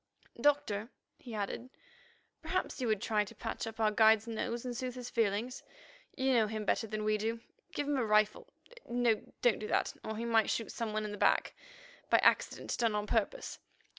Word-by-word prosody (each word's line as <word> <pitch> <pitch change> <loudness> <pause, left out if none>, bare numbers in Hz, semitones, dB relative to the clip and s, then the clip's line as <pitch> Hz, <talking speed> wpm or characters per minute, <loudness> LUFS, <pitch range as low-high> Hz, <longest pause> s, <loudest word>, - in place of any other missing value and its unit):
"Doctor," 250 -7 +2 0.3
he 235 -4 -8
added, 210 +4 -4 0.7
"perhaps 370 -7 -2
you 245 - 0
would 215 -3 +1
try 210 -1 +2
to 205 - -12
patch - - -4
up 225 0 -8
our 215 -1 +3
guide's 220 0 +5
nose 230 +1 -3
and 245 -1 -3
soothe 255 0 -4
his 250 -1 -7
feelings. 225 +3 0 0.6
You 265 0 +2
know 225 -3 +4
him 215 0 -4
better 225 - +1
than 215 0 -3
we 215 0 +1
do. 225 +2 -1 0.3
Give 290 - -2
him 290 -1 +1
a 255 - +1
rifle. 215 -1 +2 0.4
No, 240 -2 +2 0.2
don't 240 -3 +4
do 215 - -4
that, - - +1
or 220 0 -4
he 230 - -3
might 225 -2 +3
shoot 225 - -1
some 230 -2 -3
one 215 0 -1
in 210 - -4
the 205 - -7
back—by - - 0
accident - - +2
done 230 -3 +2
on 210 0 -1
purpose. 215 -1 -1
225 Hz, 195 wpm, -33 LUFS, 215-245 Hz, 0.7 s, guide's